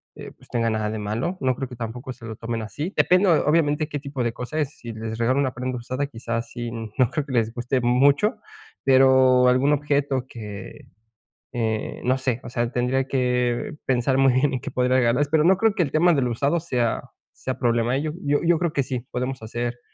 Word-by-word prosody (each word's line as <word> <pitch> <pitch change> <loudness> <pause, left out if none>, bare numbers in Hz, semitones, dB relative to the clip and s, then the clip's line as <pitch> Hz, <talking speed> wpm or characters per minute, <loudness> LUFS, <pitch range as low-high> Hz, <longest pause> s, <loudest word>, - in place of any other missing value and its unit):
eh - - -9
pues, - - -20
tenga 115 -1 0
nada 110 -1 -1
de 110 0 -4
malo. 115 - -2
No 130 -1 +1
creo 135 - -4
que 125 - -9
tampoco 120 +3 -6
se 120 -2 -13
lo 110 -1 -6
tomen 115 +1 -4
así. 145 - -5
Depende 185 +2 +4
o-obviamente, 155 -1 +2
qué 145 - -3
tipo 140 -2 -4
de 120 - 0
cosas 125 +6 -3
es. 145 -1 -4
Si 115 -1 -7
les 110 0 -5
regalo 120 +4 +1
una 130 -3 0
prenda 125 +1 -3
usada, 130 +4 -3
quizás 115 -2 -4
sí 120 -1 -5
No 115 +1 -1
creo 150 -3 -2
que 140 - -7
les 115 -2 +1
guste 125 +2 -1
mucho. 140 - +3 0.5
Pero 130 -1 +5
algún 130 +4 +4
objeto 140 -3 0
que, 105 -3 -9 0.7
eh, 110 -2 -2
no 130 +2 +2
sé. 130 -2 -2
O - - -7
sea, 120 -1 -1
tendría 130 +2 0
que 125 -1 0
pensar 130 +1 +1
muy 135 -1 +4
bien, 135 +3 +2
en 130 - -1
qué - - -6
podría 125 0 +2
regalarles. 130 +3 +2
Pero 155 0 +3
no 185 +3 +5
creo 225 +1 +3
que 185 - +2
el 140 - -4
tema 175 +3 +4
de 140 - +2
lo 125 -1 0
usado 140 +8 +1
sea 125 -8 -2 0.2
sea 130 - -5
problema, 120 +1 +1
¿eh? - - -1
Yo 155 0 -2
yo 145 0 +2
yo 170 -1 +3
creo 170 -3 -1
que 140 - +1
sí, 125 -1 -4
podemos 125 +1 -3
hacer 120 +2 -4
130 Hz, 225 wpm, -23 LUFS, 120-140 Hz, 0.7 s, Pero